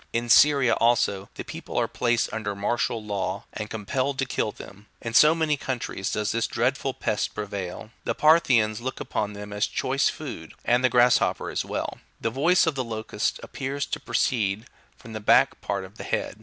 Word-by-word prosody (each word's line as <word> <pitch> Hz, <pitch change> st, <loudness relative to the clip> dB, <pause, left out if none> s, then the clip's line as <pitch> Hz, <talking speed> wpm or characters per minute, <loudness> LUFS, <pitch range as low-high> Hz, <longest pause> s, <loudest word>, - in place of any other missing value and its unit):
In 120 Hz, +1 st, -1 dB
Syria, 140 Hz, 0 st, +6 dB
also, 105 Hz, -4 st, +2 dB
the -, -, -5 dB
people -, -, -7 dB
are -, -, +2 dB
placed 120 Hz, -1 st, 0 dB
under 105 Hz, -2 st, -3 dB
martial 110 Hz, +2 st, -1 dB
law, 100 Hz, -2 st, -2 dB
and 105 Hz, -1 st, -5 dB
compelled 130 Hz, +6 st, -2 dB
to 135 Hz, -, 0 dB
kill 110 Hz, -3 st, -1 dB
them: 100 Hz, +1 st, -13 dB
in 115 Hz, -, -5 dB
so 150 Hz, +7 st, +7 dB
many 155 Hz, -3 st, +1 dB
countries 120 Hz, -8 st, -3 dB
does 105 Hz, -1 st, -1 dB
this 115 Hz, 0 st, 0 dB
dreadful 130 Hz, +2 st, -1 dB
pest 105 Hz, -, -2 dB
prevail. 100 Hz, 0 st, -5 dB
The -, -, -1 dB
Parthians 125 Hz, -9 st, +4 dB
look 130 Hz, +2 st, -4 dB
upon 105 Hz, 0 st, -2 dB
them 105 Hz, 0 st, -8 dB
as 105 Hz, 0 st, +1 dB
a -, -, -14 dB
choice 135 Hz, +1 st, +1 dB
food,33 120 Hz, -, -7 dB
and 120 Hz, +1 st, +3 dB
the 130 Hz, -, +5 dB
grasshopper 125 Hz, +1 st, +3 dB
as -, -, -1 dB
well. -, -, -4 dB, 0.2 s
The 115 Hz, -, -1 dB
voice 170 Hz, +9 st, +3 dB
of 160 Hz, -, +1 dB
the 130 Hz, -2 st, -2 dB
locust 110 Hz, -2 st, -2 dB
appears 140 Hz, +1 st, -3 dB
to -, -, -4 dB
proceed 105 Hz, -2 st, 0 dB, 0.3 s
from 115 Hz, -2 st, -12 dB
the 110 Hz, -, -4 dB
back 105 Hz, -, +4 dB
part 100 Hz, -1 st, -2 dB
of 95 Hz, +3 st, -15 dB
the -, -, -5 dB
head. -, -, -3 dB
115 Hz, 195 wpm, -25 LUFS, 105-130 Hz, 0.3 s, so